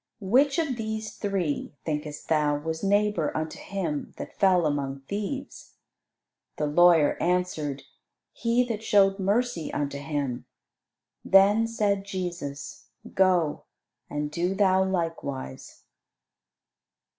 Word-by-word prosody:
"Which 260 - +3
of 300 -7 0
these 220 -1 -4
three, 190 -9 -2
thinkest 150 -1 -4
thou, 150 -2 +2
was 160 +3 -4
neighbour 205 -4 +2
unto 155 0 -4
him 170 -7 -4
that - - -8
fell 185 -4 +4
among 140 -2 -2
thieves?" 205 - -6 0.8
The 150 - 0
lawyer 165 0 +4
answered, 160 -6 -1 0.5
"He 235 +1 +1
that 230 -3 -4
showed 200 -3 +3
mercy 200 -3 0
unto 140 -1 -2
him." 140 -4 -3 0.8
Then 205 +4 +5
said 205 -3 0
Jesus, 175 -7 -6 0.3
"Go, 180 -5 +2 0.4
and 150 0 -3
do 175 +4 -1
thou 190 -1 +4
likewise." 165 - -4
180 Hz, 110 wpm, -26 LUFS, 150-205 Hz, 0.8 s, Then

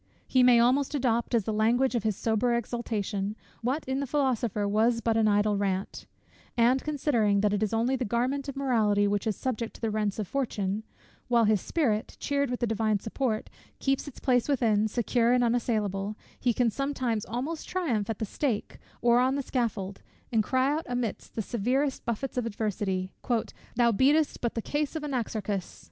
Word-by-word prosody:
He 260 - +3
may 250 -1 +7
almost 265 +5 +3
adopt, 240 -3 +1
as 225 - +2
the 220 - -2
language 235 +5 +2
of 235 - +1
his 215 -1 0
sober 230 +3 +1
exultation, 210 -4 -2 0.3
what 260 +6 -1
in 265 +1 -1
the 280 - -2
philosopher 240 -7 0
was 225 +3 +2
but 230 -1 0
an 220 -1 +3
idle 205 0 +3
rant: 195 -1 -2 0.5
and, 245 +3 +4
considering 240 -9 +1
that 205 0 +2
it 205 - 0
is 215 - +1
only 230 +4 +1
the 260 - -2
garment 255 +5 -1
of 275 - -5
mortality 220 -7 +2
which 205 +1 0
is 215 - 0
subject 235 -3 -3
to - - -14
the 225 -2 0
rents 210 -2 -1
of 215 -3 -3
fortune; 210 -6 -1 0.5
while 235 -1 +4
his 210 -3 +3
spirit, 225 -10 -1
cheered 280 -2 0
with 245 - -3
the - - +3
divine 220 -1 +1
support, 220 +1 -2 0.3
keeps 270 +1 0
its 285 - -9
place 250 0 +2
within, 220 -6 +2
secure 235 +1 +2
and 250 -1 +3
unassailable, 215 -4 0 0.2
he 245 - +2
can 235 0 +2
sometimes 255 -5 -1
almost 270 +8 -4
triumph 245 - -1
at 225 - -2
the 220 - -2
stake, 230 +1 -2 0.2
or 240 0 +5
on 260 +2 +2
the 280 - -1
scaffold, 215 -7 -2 0.3
and 220 -2 +3
cry 260 +4 +2
out 315 +2 -2
amidst 245 -4 -3
the 220 - -1
severest 255 +6 0
buffets 235 +3 -3
of 235 - -2
adversity, 200 -3 -2 0.6
"Thou 235 0 +4
beatest 285 +7 +3
but 235 - -1
the 230 - -2
case 295 +1 -2
of 315 - -3
Anaxarchus." 215 -8 -3
235 Hz, 190 wpm, -28 LUFS, 210-260 Hz, 0.6 s, may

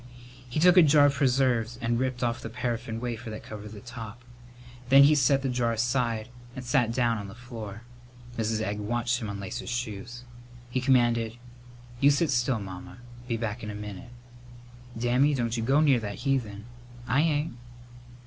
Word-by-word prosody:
He 140 - -2
took 180 +3 +6
a - - +11
jar 145 -2 +6
of 145 - +4
preserves 125 -3 +1
and 120 0 0
ripped 130 -1 -1
off 120 -1 -1
the 115 - -6
paraffin 115 -1 -3
wafer 115 -1 -5
that 110 - -7
covered 105 -1 -8
the 105 - -9
top. 120 -1 -9 0.7
Then 135 +1 +8
he 145 +2 +6
set 135 -1 +3
the - - 0
jar 120 -2 0
aside 115 -1 0 0.3
and 130 -1 -7
sat 120 -2 +2
down 115 -2 +1
on 100 - -6
the 100 - -10
floor. 115 -3 -8 0.5
Mrs. 110 -1 -1
Egg 105 -1 -2
watched 120 +4 -1
him 110 - -4
unlace 100 -2 -5
his - - -7
shoes. 120 0 -5 0.5
He 130 - 0
commanded, 120 -3 +2 0.6
"You 140 - +6
sit 145 +3 +2
still, 120 -1 +1
Mamma. 95 0 -9 0.3
Be 115 -2 -1
back 115 +1 -3
in 105 - -6
a 105 - -5
minute." 105 +1 -8 0.9
"Dammy, 125 +5 +2
don't 120 -2 -1
you 115 - -1
go 135 +6 +3
near 140 -5 +4
that 100 -2 -5
heathen!" 120 -7 -2 0.4
"I 135 +4 +3
ain't." 150 -2 0
120 Hz, 180 wpm, -27 LUFS, 110-130 Hz, 0.9 s, a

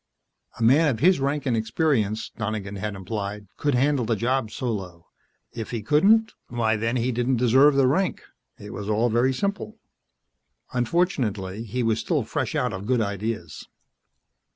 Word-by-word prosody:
A - - -1
man 140 +8 +5
of 115 -5 -2
his 180 +5 +4
rank 140 +1 -1
and 125 -3 +1
experience, 110 -2 0
Donegan 105 -2 -4
had 105 +1 -4
implied, 100 +1 -5
could 145 -3 0
handle 135 +1 +2
the 115 0 0
job 120 +1 0
solo. 95 -9 -5 0.5
If 115 -2 -6
he 115 -3 -4
couldn't 205 - +4
why, 115 -2 0
then, 115 +3 -1
he 125 +1 0
didn't 125 +2 0
deserve 130 +5 +5
the 135 -1 +4
rank. 170 +8 +1 0.3
It 105 0 -9
was 105 0 -5
all 110 +3 +2
very 120 +4 +3
simple. 200 - -3 1.0
Unfortunately, 115 - -1
he 120 +3 -2
was 115 -1 +1
still - - 0
fresh - - -3
out 125 -3 0
of 95 +2 -6
good 125 -1 +2
ideas. 100 -5 -4
115 Hz, 160 wpm, -24 LUFS, 105-135 Hz, 1.0 s, man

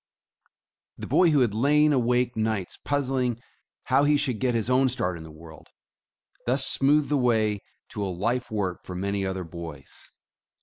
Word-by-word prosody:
The - - -7
boy 180 - +4
who 150 -3 +3
had 115 -5 +2
lain 150 +6 +3
awake 125 -1 +1
nights 110 -4 -2
puzzling 130 -4 -1 0.4
how 140 - +2
he 145 0 +4
should 125 -6 -1
get 125 -2 0
his 115 -2 -1
own 130 +1 +3
start 90 -8 -2
in 85 - -9
the 80 - -10
world, 80 +1 -14 0.8
thus 135 +2 +3
smoothed 145 +2 +3
the 145 - +2
way 110 -5 +1 0.3
to 105 - -5
a - - -1
life 115 +8 -2
work 100 -5 -3
for 90 - -8
many 100 +2 -2
other 95 -1 -3
boys. 80 -5 -10
120 Hz, 170 wpm, -26 LUFS, 95-135 Hz, 0.8 s, boy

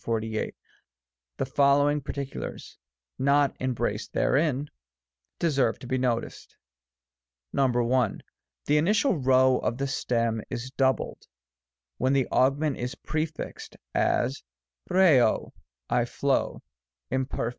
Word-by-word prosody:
The 110 -1 -2 0.9
following 145 +2 +3
particulars, 140 0 -6 0.4
not 140 0 +3
em 130 -1 -1
braced 110 -2 -3
therein, 145 0 +1 0.7
deserve 135 -8 +1
to - - -11
be 130 +1 -1
noticed: 120 -2 -3 1.0
I. 135 - +4 1.0
The 150 - +3
initial 205 - +2
q 130 +1 +1
of 130 -2 +3
the 135 - -1
stem 115 -4 -1
is 125 0 -5
doubled, 135 -1 0 0.7
when 130 +2 +2
the 135 -3 +2
augment 140 +3 +2
is 125 +2 -4
prefixed; 155 +1 -5 0.2
as, 130 +3 +1 0.5
qkco^ 160 -12 +4 0.2
" - - -60
I - - +3
flow," - - -1 0.5
Lnperf. 130 -3 -1
130 Hz, 105 wpm, -27 LUFS, 120-145 Hz, 1.0 s, I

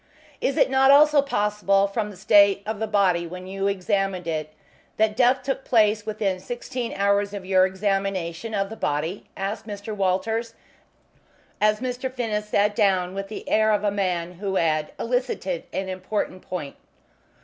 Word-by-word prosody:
"Is 270 - 0
it - - +3
not 265 0 +4
also 295 +1 +7
possible, 210 -6 +1
from 210 +1 -2
the 200 - -11
state 200 +1 +5
of 215 -1 -4
the 220 - -1
body 185 -5 +2
when 180 +2 -8
you 195 +1 -2
examined 195 -2 -1
it, 155 -2 -3 0.5
that 215 -1 +2
death 255 +2 +3
took 270 0 -2
place 215 -2 +2
within 205 -3 -1
sixteen 240 +3 -5
hours 200 +1 +1
of 195 -2 -7
your 185 0 +4
examination 195 0 -2
of 195 +1 -1
the - - -5
body?" 160 +1 -2
asked 205 +3 -4
Mr. 205 +1 -6
Walters, 220 +4 -1 1.1
as 215 +1 +3
Mr. 255 0 -3
Finnis 215 -4 -3
sat 205 0 +2
down 190 -4 +2
with 195 0 -4
the 215 - -8
air 220 0 +3
of 210 -1 +1
a 205 - +2
man 180 -4 -1
who 195 -1 -2
had 155 -3 +1
elicited 230 -8 -2
an 190 - -3
important 185 0 -3
point. 155 -7 -6
200 Hz, 165 wpm, -24 LUFS, 185-220 Hz, 1.1 s, also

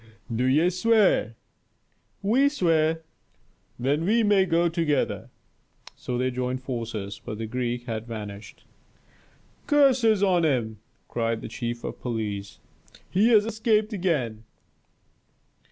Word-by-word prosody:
"Do 125 +3 +1
ye 155 +7 +3
swear?" 195 - +2 0.9
"We 255 +8 +4
swear." 165 - +1 0.7
"Then 140 +6 0
we 225 +6 +3
may 200 -2 +4
go 170 +1 +2
together." 150 - -1 0.7
So 125 - -4
they 130 +1 0
joined 125 +1 -3
forces, 115 -6 -5
but 110 -3 -6
the 115 - -4
Greek 120 +1 -3
had 115 -1 -5
vanished. 105 -3 -8 1.0
"Curses 255 -8 +4
on 180 -3 +3
him!" 120 -8 0 0.3
cried 115 -1 -2
the - - -6
chief 120 +1 -5
of - - -6
police. 105 -5 -4 0.5
"He 200 +5 +3
has 215 -3 +5
escaped 220 0 +1
again!" 140 - -1
135 Hz, 120 wpm, -25 LUFS, -, 1.0 s, has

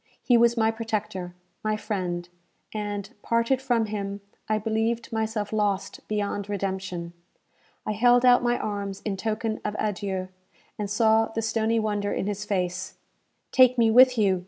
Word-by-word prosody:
He 245 - +4
was 235 0 +4
my 220 0 +3
protector 215 -5 -4 0.3
my 215 0 0
friend; 180 -5 -3 0.5
and, 205 -2 -3
parted 230 +3 +1
from 240 -4 +1
him, 200 -1 -4 0.3
I 215 - +2
believed 225 +2 -1
myself 220 -1 -2
lost 205 -2 -1
beyond 205 -1 -2
redemption. 190 -3 -3 0.7
I - - -1
held 245 +3 +4
out 245 0 +6
my 240 0 +1
arms 200 -2 -4
in 205 -3 -1
token 220 +2 -2
of 210 0 -3
adieu, 190 -3 -2 0.5
and 205 -1 -2
saw 220 +1 +3
the 225 0 -4
stony 225 +1 +1
wonder 205 -2 -1
in - - -1
his 205 0 -3
face. 185 -2 -2 0.6
"Take 255 -1 +6
me 230 -1 +4
with 250 +1 +7
you!" 195 -4 +3
215 Hz, 155 wpm, -26 LUFS, 200-225 Hz, 0.7 s, with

